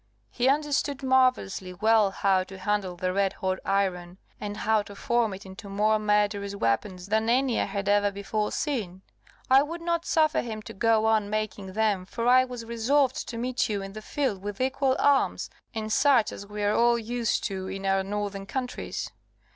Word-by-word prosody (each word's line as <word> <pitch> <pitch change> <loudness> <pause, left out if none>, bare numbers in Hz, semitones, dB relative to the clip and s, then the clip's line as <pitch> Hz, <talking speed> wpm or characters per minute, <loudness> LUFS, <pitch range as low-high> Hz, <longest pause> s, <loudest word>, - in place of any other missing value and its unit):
He 250 +2 +2
understood 285 -1 0
marvellously 255 -8 +1
well 215 +1 +4
how 195 -1 +1
to 190 0 -11
handle 190 -1 -1
the 185 +1 -2
red 195 0 +1
hot 185 0 -2
iron, 185 -3 -1 0.2
and 205 0 -5
how 220 0 +2
to 205 0 -11
form 235 +1 +1
it 195 +1 -8
into 190 +2 -10
more 215 +2 +2
murderous 205 -1 +1
weapons 180 - -1
than 220 +2 0
any 255 0 +2
I - - +1
had 200 0 -4
ever 205 0 +3
before 200 +1 -3
seen. 200 - -3 0.4
I 265 +1 +6
would 330 +4 -4
not 340 0 -1
suffer 310 -1 +3
him 220 -3 -6
to - - -9
go 220 +1 +2
on 220 -2 +2
making 210 -3 -3
them, 210 -3 +1
for 230 +4 -4
I 255 +1 +6
was 245 -2 -7
resolved 255 +4 +1
to 230 - -5
meet 250 0 -1
you 200 -2 -2
in 195 0 -8
the 215 - -7
field 235 -5 -2
with 205 0 -6
equal 265 0 +1
arms, 285 -1 +2 0.2
and 215 -2 -3
such 270 -6 +4
as 200 - -9
we 210 0 -5
are 205 +1 +2
all 235 +1 +4
used 235 0 -1
to 190 -1 -3
in 195 +1 -5
our 195 0 +2
northern 200 0 -4
countries. 250 +2 -4
210 Hz, 190 wpm, -27 LUFS, 195-245 Hz, 0.4 s, I